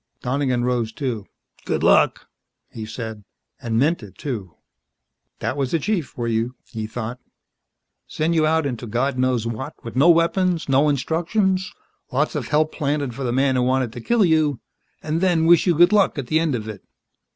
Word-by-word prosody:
Donegan 130 -1 0
rose, 120 -3 0
too. 115 -5 -4 0.4
"Good - - -2
luck," - - +4 0.5
he 110 -1 -7
said. 110 -2 -6 0.4
And 115 -2 -1
meant 150 +6 +2
it, 105 -3 -12
too. 105 - -5 0.8
That - - -3
was 135 -3 -1
the 165 - +1
chief 170 - -1
for 120 -1 -5
you, 115 +2 -1
he 110 -3 -6
thought. 120 +2 -5 0.9
Send 160 +2 -1
you 155 -2 +3
out 160 -1 +2
into 120 -3 -4
God 125 +4 -1
knows 125 -3 +1
what 130 +6 -5
with 115 - -8
no 140 +7 +5
weapons, 170 +1 +2
no 140 +2 +3
instructions, 185 - 0 0.4
lots 145 +4 0
of 140 -7 -3
help 155 +1 +2
planted 145 -4 -2
for 135 - -6
the 120 - -1
man 135 +1 +2
who 125 - +2
wanted 130 -2 +1
to 120 - -7
kill 230 - +3
you 155 -6 +2 0.4
and 155 +2 -1
then 175 -4 +2
wish 170 +2 +5
you 175 - +4
good 175 +5 +5
luck 200 -5 +3
at 140 - -3
the 155 +6 +1
end 160 -5 0
of 110 -2 -5
it. 105 -3 -8
135 Hz, 185 wpm, -22 LUFS, 120-160 Hz, 0.9 s, no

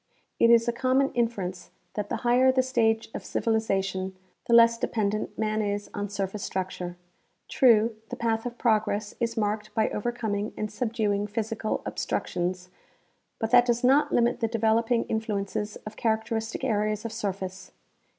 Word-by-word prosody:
It 230 - +5
is 235 0 +5
a 235 - +1
common 260 +2 +2
inference 195 -7 -2 0.2
that 205 -1 -3
the - - -1
higher 250 +2 +5
the 260 0 +2
stage 225 -3 +1
of - - -5
civili 225 -1 0
zation, 195 -3 -2 0.3
the 235 - +2
less 230 0 +6
dependent 215 -2 -1
man 215 0 0
is 205 0 -3
on 205 0 -3
surface 200 0 -3
structure. 180 -2 -4 0.5
True, 230 -3 +4
the - - -4
path 225 0 -1
of 240 0 -7
progress 215 -2 +1
is 230 -1 -1
marked 210 0 -1
by 220 -1 +2
overcoming 215 -2 -2
and 215 -1 -3
subduing 210 -3 -1
physical 220 +1 -2
obstructions, 180 +1 -2 0.7
but 225 -1 -2
that 245 0 +6
does 240 +1 +1
not 270 +4 +4
limit 240 0 +2
the 230 - +1
developing 230 +1 +2
influences 210 -1 -3
of 215 0 -8
characteristic 220 +1 -1
areas 215 -3 0
of 230 - -3
surface. 190 -3 -5
220 Hz, 155 wpm, -27 LUFS, 205-235 Hz, 0.7 s, less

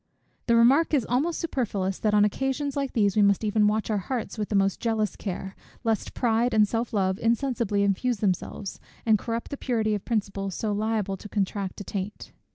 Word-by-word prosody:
The 235 - +4
remark 270 +8 +5
is 255 -6 +1
almost 290 +8 0
superfluous, 205 - -2
that 210 -1 +2
on 205 0 +6
occasions 270 +5 -1
like 275 -2 -2
these 205 -4 +2
we 215 - +4
must 200 +1 +3
even 210 0 +3
watch 215 +1 0
our 210 - +1
hearts 235 +5 -4
with 210 -2 -3
the 210 - -1
most 195 -1 +2
jealous 220 -3 0
care, 190 -1 -5 0.3
lest 225 -3 -1
pride 235 0 +1
and 210 -1 +5
self 230 +2 -2
love 190 -2 0
insensibly 230 -3 +1
infuse 210 +5 +1
themselves, 195 0 -2 0.3
and 220 -2 +4
corrupt 230 +2 -4
the 285 - -3
purity 220 -5 0
of 205 - -2
principles 200 -4 -2
so 215 - -2
liable 210 -2 -1
to 210 - -10
contract 200 -1 -2
a - - -4
taint. 200 +1 -5
215 Hz, 195 wpm, -26 LUFS, 200-235 Hz, 0.3 s, on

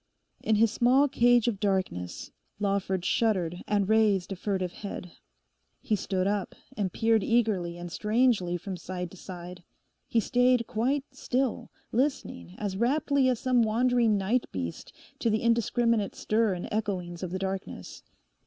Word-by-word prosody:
In 220 - +2
his 220 0 +4
small 255 +5 +4
cage 245 -3 +4
of 215 -5 0
darkness 190 - -2 0.3
Lawford 195 -3 -1
shuddered 180 -7 0
and 205 -2 +1
raised 210 -4 +3
a - - -2
furtive 185 -1 -2
head. 195 -3 -7 0.7
He 215 - 0
stood 185 -1 -1
up 200 -1 -1 0.2
and 200 -5 -1
peered 225 0 +2
eagerly 205 -7 +1
and 175 0 -7
strangely 210 -5 +1
from 185 +1 -6
side 180 0 -5
to 190 - -13
side. 180 0 -9 0.5
He 230 - +2
stayed 245 +2 +3
quite 250 +5 0
still, 260 -2 -1 0.2
listening 230 - -2
as 195 -2 -3
raptly 270 +3 +2
as 245 -3 0
some 255 -2 +2
wandering 230 0 +2
night 215 +6 0
beast 85 -3 -5 0.3
to 230 - +1
the 215 +1 0
indiscriminate 230 -2 +1
stir 215 -2 +1
and 175 - -5
echoings 185 -5 -3
of 185 - -3
the 185 - -3
darkness. 190 0 -5
210 Hz, 150 wpm, -28 LUFS, 185-235 Hz, 0.7 s, his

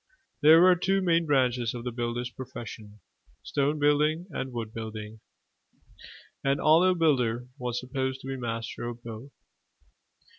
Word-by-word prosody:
There 160 +3 +8
were 185 0 +7
two 190 +3 +1
main 170 -2 +2
branches 125 -4 +1
of 120 - -6
the 125 - -3
builder's 120 +1 -3
profession: 110 -5 -9 0.4
stone 145 +2 0
building 150 +3 +2
and 135 -2 -4
wood 115 -2 -5
building. 110 -1 -7 1.2
An 135 0 +2
ollave 175 +4 +4
builder 125 -7 +1
was 125 -1 -2
supposed 130 0 -3
to - - -9
be 135 - -3
master 120 -1 -4
of 120 0 -7
both. 115 +4 -8
125 Hz, 140 wpm, -27 LUFS, 120-150 Hz, 1.2 s, There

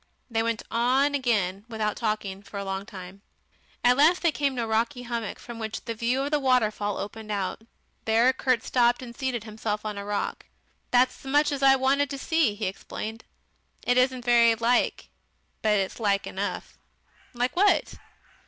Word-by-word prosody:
They 225 0 +1
went 230 -1 -1
on 255 +5 +2
again, 205 -8 0
without 215 -2 -2
talking, 215 -3 -2
for 200 0 -10
a 200 - -4
long 195 +1 -4
time. 190 -1 -10 0.6
At 250 +1 +5
last 325 +6 +4
they 340 - +4
came 285 -2 -1
to 240 - -1
a - - -3
rocky 235 +4 0
hummock, 235 -3 -4
from 235 -1 -9
which 220 -1 -5
the 230 - -3
view 240 +4 0
of 285 - -3
the 300 - +2
waterfall 215 -6 +1
opened 215 +1 -6
out. 200 0 -2 0.4
There 230 +4 +4
Kurt 255 -3 +1
stopped 240 0 +2
and 240 -1 -9
seated 255 -4 -2
himself 215 -1 -4
on 210 -1 -3
a - - -5
rock. 205 0 -3 0.4
"That's 250 +1 +2
as 270 - -7
much 295 +1 +3
as 280 -1 -3
I 270 0 +7
wanted 270 +2 +2
to 280 - -4
see," 290 -6 +1
he 215 - -3
explained. 220 +3 -6 0.6
"It 245 - +3
isn't 255 -1 +2
very 235 -1 +5
like, 235 +2 +1 0.5
but 210 -1 +3
it's 195 +3 -2
like 200 -3 +1
enough." - - -5 0.6
"Like 245 +1 -1
what?" 400 +3 +3
235 Hz, 180 wpm, -26 LUFS, 210-260 Hz, 0.6 s, I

